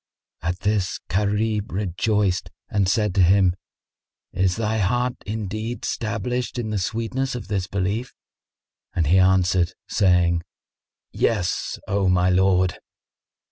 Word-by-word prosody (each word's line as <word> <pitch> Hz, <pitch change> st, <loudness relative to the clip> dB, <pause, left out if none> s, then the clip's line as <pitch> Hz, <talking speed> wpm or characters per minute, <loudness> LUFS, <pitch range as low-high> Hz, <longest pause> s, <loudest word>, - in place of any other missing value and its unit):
At 90 Hz, +2 st, -3 dB
this 100 Hz, -2 st, 0 dB
Gharib 105 Hz, +2 st, 0 dB
rejoiced 100 Hz, 0 st, 0 dB, 0.2 s
and 100 Hz, -3 st, +2 dB
said 105 Hz, -1 st, +1 dB
to 95 Hz, -, +3 dB
him, 95 Hz, 0 st, +5 dB, 0.8 s
"Is 95 Hz, -1 st, +1 dB
thy 110 Hz, 0 st, -1 dB
heart 120 Hz, +6 st, 0 dB
indeed 110 Hz, +2 st, -4 dB
stablished 120 Hz, +2 st, -2 dB
in 110 Hz, -3 st, -2 dB
the 105 Hz, -, 0 dB
sweetness 115 Hz, +7 st, -2 dB
of 115 Hz, -4 st, -7 dB
this 95 Hz, -3 st, -1 dB
Belief?" 100 Hz, +6 st, -2 dB, 0.8 s
And 85 Hz, -, +2 dB
he 90 Hz, +6 st, +4 dB
answered, 95 Hz, -1 st, +3 dB
saying, 90 Hz, -4 st, +3 dB, 0.7 s
"Yes, 100 Hz, -6 st, 0 dB
O 100 Hz, -2 st, +1 dB
my 90 Hz, 0 st, +3 dB
lord!" 95 Hz, -1 st, +2 dB
100 Hz, 120 wpm, -23 LUFS, 90-110 Hz, 0.8 s, him